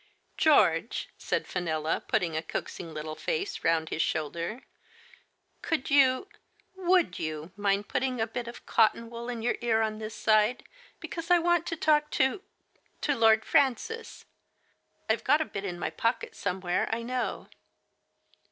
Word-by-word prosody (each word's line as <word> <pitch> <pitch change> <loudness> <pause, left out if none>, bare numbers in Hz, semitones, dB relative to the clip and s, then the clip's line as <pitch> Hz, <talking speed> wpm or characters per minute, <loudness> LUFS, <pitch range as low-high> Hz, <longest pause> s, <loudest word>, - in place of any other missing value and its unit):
" - - -42
George," - - +3
said - - -1
Fenella, 160 -3 -2
putting 175 -7 0
a 160 - 0
coaxing 165 0 -5
little 155 0 -5
face 405 - -3
round 160 -1 +2
his 165 - -1
shoulder, 170 - -2 0.5
" - - -38
could 310 -4 -2
you 270 +4 +4 0.3
— - - -38
would 365 -2 +3
you 155 +1 -4
mind 200 0 0
putting 255 -1 -1
a 225 - +2
bit 235 +1 -5
of 235 - -9
cotton 230 +1 +2
wool 235 +1 -6
in 235 -2 -4
your 240 - +1
ear 225 -2 +2
on 215 -1 -2
this 220 0 -6
side, 215 +2 +2 0.4
because 335 0 -6
I 355 - +7
want 345 0 +2
to 330 - -2
talk 300 -1 +2
to 265 +9 +2 0.3
— - - -39
to 290 - +1
Lord 220 -2 +4
Francis? 365 - 0 0.8
IVe - - +1
got 295 - +4
a 315 - 0
bit 200 -6 -6
in 180 -3 -4
my - - -3
pocket 230 +2 -1
somewhere, 180 -2 -1
I 230 +1 -1
know." 250 +1 -3
230 Hz, 165 wpm, -28 LUFS, 180-280 Hz, 0.8 s, I